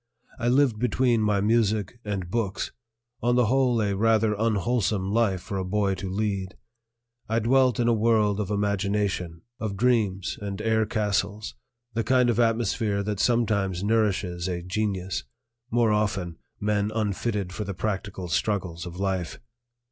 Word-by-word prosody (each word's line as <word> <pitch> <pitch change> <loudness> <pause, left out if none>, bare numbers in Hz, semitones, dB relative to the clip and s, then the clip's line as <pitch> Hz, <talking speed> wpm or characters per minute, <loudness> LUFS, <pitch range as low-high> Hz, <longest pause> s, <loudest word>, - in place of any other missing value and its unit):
I 120 - -1
lived 125 -3 +3
between 120 0 +2
my 105 -2 +2
music 110 0 +1
and 95 -4 -4
books, 110 -4 -2 0.5
on 120 +1 +2
the 125 -1 +4
whole 125 0 +2
a 100 -1 0
rather 110 +1 +3
unwholesome 105 -2 0
life 105 -5 +1
for 95 +2 -4
a - - -1
boy 100 +1 0
to 95 0 -5
lead. 100 -1 -2 0.7
I 110 - +1
dwelt 130 +2 +3
in 120 - +2
a 120 - +4
world 110 -2 +2
of 100 -2 -2
imagination, 100 -4 -1 0.2
of 105 -3 -3
dreams 105 -5 +1
and 100 -1 -4
air 110 0 +1
castles 105 - -1 0.4
the 115 +1 0
kind 125 +1 +3
of 115 - -1
atmosphere 115 -3 +1
that 105 -1 -3
sometimes 100 -7 +1
nourishes 100 -5 0
a 90 -2 -3
genius, 95 -1 -2 0.5
more 115 -2 +3
often 100 -5 -1 0.2
men 105 0 0
unfitted 105 -2 -1
for 105 - -3
the 100 -2 -5
practical 95 -2 -3
struggles 90 -2 -1
of 85 - -8
life. 95 -3 -2
105 Hz, 150 wpm, -26 LUFS, 95-115 Hz, 0.7 s, the